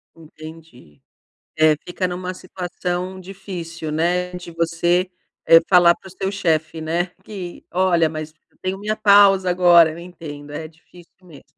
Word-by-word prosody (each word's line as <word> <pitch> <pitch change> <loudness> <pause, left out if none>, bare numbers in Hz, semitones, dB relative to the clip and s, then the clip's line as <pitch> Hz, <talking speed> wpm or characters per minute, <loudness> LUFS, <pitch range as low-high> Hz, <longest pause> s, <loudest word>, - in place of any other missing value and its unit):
Entendi. 155 - -14 0.6
É, 155 -1 +5
fica 180 +1 -2
numa 180 +1 -5
situação 180 0 -5
difícil, 180 -4 -7
né, 180 +3 0
de 180 -1 -8
você, 170 +2 0 0.4
eh, 165 - +9
falar 175 -2 +6
para 190 - -16
o - - -12
seu 190 +1 -3
chefe, 160 -5 -1
né, 170 +3 -1 0.2
que: 185 -4 -8
“Olha, 175 -3 +2
mas 155 0 -7 0.2
eu - - -35
tenho 190 +1 -3
minha 210 +1 -2
pausa 200 -3 +5
agora”. 175 -2 +5
Eu 165 - -9
entendo, 155 -5 -10
é 155 +2 -6
difícil 165 +2 -20
mesmo. 170 -6 -15
175 Hz, 150 wpm, -20 LUFS, 160-185 Hz, 0.6 s, eh